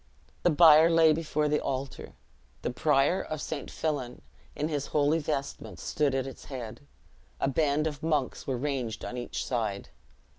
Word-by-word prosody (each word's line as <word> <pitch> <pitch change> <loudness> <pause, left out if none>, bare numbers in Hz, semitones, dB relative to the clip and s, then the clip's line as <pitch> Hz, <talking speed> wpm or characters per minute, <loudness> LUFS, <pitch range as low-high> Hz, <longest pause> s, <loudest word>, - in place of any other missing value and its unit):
The - - +4
bier 160 0 +7
lay 165 -2 +5
before 150 -1 -1
the 150 0 +2
altar. 135 0 -4 0.5
The - - -1
prior 145 +5 +2
of 155 - -5
St. 145 -1 -5
Fillan, 140 -6 -3 0.3
in 150 - -1
his 145 -3 -2
holy 150 +2 +2
vestments, 145 -2 -4
stood 145 -3 0
at 135 -1 0
its 135 - -9
head; 125 -4 -7 0.6
a - - +1
band 150 +1 +1
of 150 -3 -3
monks 150 -5 -1
were 130 -2 -1
ranged 125 -5 -3
on - - -5
each 120 -1 -4
side. 110 -5 -2
145 Hz, 160 wpm, -29 LUFS, 130-155 Hz, 0.6 s, bier